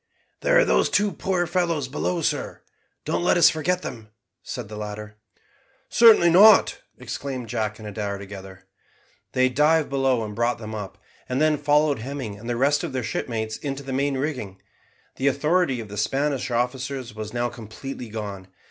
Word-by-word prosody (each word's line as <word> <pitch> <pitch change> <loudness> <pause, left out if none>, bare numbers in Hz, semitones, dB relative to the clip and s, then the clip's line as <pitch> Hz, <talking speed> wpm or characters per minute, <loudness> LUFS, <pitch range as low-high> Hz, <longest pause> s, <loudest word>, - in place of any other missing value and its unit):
"There - - +3
are - - +5
those - - +3
two 205 0 +2
poor 185 -2 -1
fellows 170 -5 0
below, 165 +5 -2
sir. 145 -1 -2 0.4
Don't - - -1
let 175 - +3
us 170 - +7
forget 180 +4 -1
them," 110 -4 -7 0.3
said 125 -4 -6
the 105 - -9
latter. 105 0 -7 0.7
"Certainly 220 -7 +7
not," 205 +4 +6 0.2
exclaimed 130 -5 -5
Jack 110 0 -2
and 110 - -9
Adair 100 -1 -4
together. 95 -1 -10 0.7
They 130 0 +4
dived 150 +3 +2
below 135 -4 +1
and 105 - -7
brought 120 +3 0
them 110 -1 -8
up, 105 -3 -6 0.3
and 130 +1 0
then 155 0 +3
followed 145 -1 +2
Hemming 130 -3 -5
and 115 +3 -8
the 120 - -1
rest 145 +4 +2
of 165 -6 -4
their 130 -1 -2
shipmates 110 -1 -3
into 140 -1 -5
the 135 -1 -5
main 140 +1 0
rigging. 130 -9 -4 0.6
The 135 - 0
authority 150 0 +1
of 110 - -6
the 105 0 -9
Spanish 135 +5 0
officers 125 0 -2
was 110 0 -6
now 120 0 -1
completely 120 +2 -8
gone. 100 -3 -6
130 Hz, 175 wpm, -24 LUFS, 110-150 Hz, 0.7 s, us